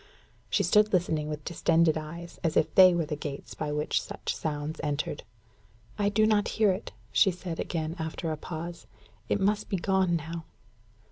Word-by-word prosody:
She - - +2
stood 210 0 +4
listening 160 -4 +1
with 150 -1 -5
distended 165 -2 +3
eyes, 170 +2 -7
as 165 - +1
if 155 - +2
they 185 -2 +8
were 170 -2 +1
the 150 0 -3
gates 145 -1 -6
by 150 -1 -3
which 150 +1 0
such - - -4
sounds 150 0 -3
entered. 145 -2 -2 0.8
"I 205 0 +3
do 215 +1 +3
not 215 -1 +3
hear 215 -3 +5
it," 190 +4 -4 0.2
she 200 - +5
said 180 -2 -5
again, 160 -1 -2
after 160 +1 -3
a - - -1
pause. 170 +2 -7 0.4
"It - - +2
must 205 +2 +1
be 195 - 0
gone 190 -1 +2
now." 165 +1 -5
170 Hz, 180 wpm, -28 LUFS, 155-190 Hz, 0.8 s, they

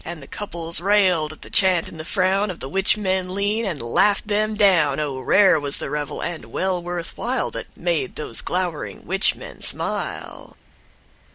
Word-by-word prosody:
And 170 -1 -6
the 140 - -10
couples 170 -5 -5
railed 185 -6 +3
at 155 - -12
the - - -12
chant 185 -4 +3
and 160 - -11
the - - -4
frown 195 +3 +1
Of 180 - -6
the - - -5
witch 195 +8 +2
men 185 -2 -1
lean, 205 +3 0
and 175 -8 -3
laughed 195 - +2
them 215 +1 +1
down. 170 -9 +4
(O 140 -3 -2
rare 190 +5 +5
was 140 -1 -2
the - - -5
revel, 150 -2 -3
and 170 -2 -4
well 185 -1 -1
worth 175 -1 -5
while 250 +2 -1
That - - -6
made 165 -6 -1
those 150 - -2
glowering 180 -4 -3
witch 190 +4 +3
men - - -11
smile.) - - -4
180 Hz, 185 wpm, -22 LUFS, 155-200 Hz, -, rare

